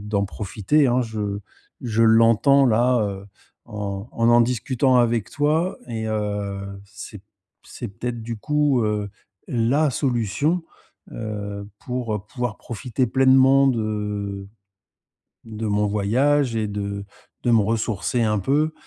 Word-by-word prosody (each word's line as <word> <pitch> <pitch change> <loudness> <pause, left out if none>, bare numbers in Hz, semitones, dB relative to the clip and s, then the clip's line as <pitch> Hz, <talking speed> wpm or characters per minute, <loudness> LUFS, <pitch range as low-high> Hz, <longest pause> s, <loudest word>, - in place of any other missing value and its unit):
d'en 100 -1 -1
profiter. 105 +9 0
Hein, 125 +1 +2
je 105 -3 -3 0.4
je 115 -2 +1
l'entends, 115 +5 +5
là, 120 +2 +3
heu, 100 -2 -3 0.4
en 100 0 -5
en 115 0 +1
en 120 0 +6
discutant 125 +2 +1
avec 120 -3 +1
toi 155 +5 0
et 110 -2 -3
heu, 100 -2 -3
c'est 100 0 -10 0.4
c'est - - -7
peut-être, 120 +4 -5
du 115 0 -5
coup, 145 -1 +1
heu, 105 -1 -1 0.4
la 130 +6 +2
solution, 135 - 0 0.5
heu, 100 -2 -5 0.2
pour 115 -5 -3
pouvoir 125 -4 -4
profiter 125 +2 -2
pleinement 135 +2 +5
de 105 -4 -2 1.0
de 110 -1 -5
mon 105 0 +1
voyage 120 +6 +1
et 110 -1 0
de 100 -1 -4 0.4
de 120 - +2
me 115 - +5
ressourcer 115 +2 -1
un 105 -1 +1
peu, 150 +9 +1
115 Hz, 125 wpm, -23 LUFS, 105-125 Hz, 1.0 s, en